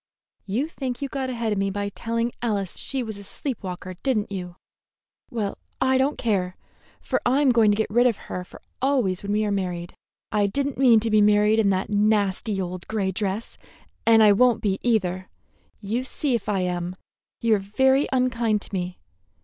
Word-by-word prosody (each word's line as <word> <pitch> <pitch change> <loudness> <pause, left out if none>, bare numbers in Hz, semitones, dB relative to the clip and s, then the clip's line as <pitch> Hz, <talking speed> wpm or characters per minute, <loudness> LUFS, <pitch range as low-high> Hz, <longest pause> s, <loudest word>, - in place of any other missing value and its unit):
"You 235 +10 0
think 260 -6 -5
you - - -1
got 265 -1 -3
ahead 235 -3 -2
of 200 - -1
me 195 0 +1
by 200 +1 -2
telling 230 +3 -2
Alice 205 -6 -1
she 265 -2 -2
was 220 -3 -5
a - - -9
sleep 260 +5 -4
walker, 185 -1 -6
did 265 -4 +1
n't 205 -1 -3
you! 180 -3 -5 0.7
Well, 210 -4 -3 0.2
I 260 0 +3
don't 275 +3 +1
care, 185 -6 0 0.4
for - - -1
I'm 265 +2 +3
going 230 -3 +4
to 205 - +2
get 220 - -1
rid 240 +3 +4
of 235 - 0
her 180 - -5
for - - -15 0.2
always 250 -9 +1
when 200 - -4
we 215 +1 +1
are 205 - -1
married. 180 -3 -3 0.4
I 205 -1 +2
did 275 +8 -1
n't 265 - -9
mean 240 -4 +6
to 225 0 0
be 215 0 +5
married 210 +1 +4
in 210 -3 +3
that 190 +1 -1
nasty 205 0 +1
old 180 -1 -5
gray 200 -3 -1
dress, 200 +3 -3 0.4
and 225 -1 +6
I 210 - +7
won't 240 +2 +3
be, 195 -2 0
either. 185 -6 0 0.5
You 225 +5 -2
see 265 +1 -1
if 220 -3 -1
I 195 -2 +1
am. 180 0 -2 0.4
You 230 -1 +2
are 210 - +3
very 265 +8 +2
unkind 235 -5 +1
to - - -4
me. 180 -1 -3
215 Hz, 200 wpm, -24 LUFS, 195-245 Hz, 0.7 s, I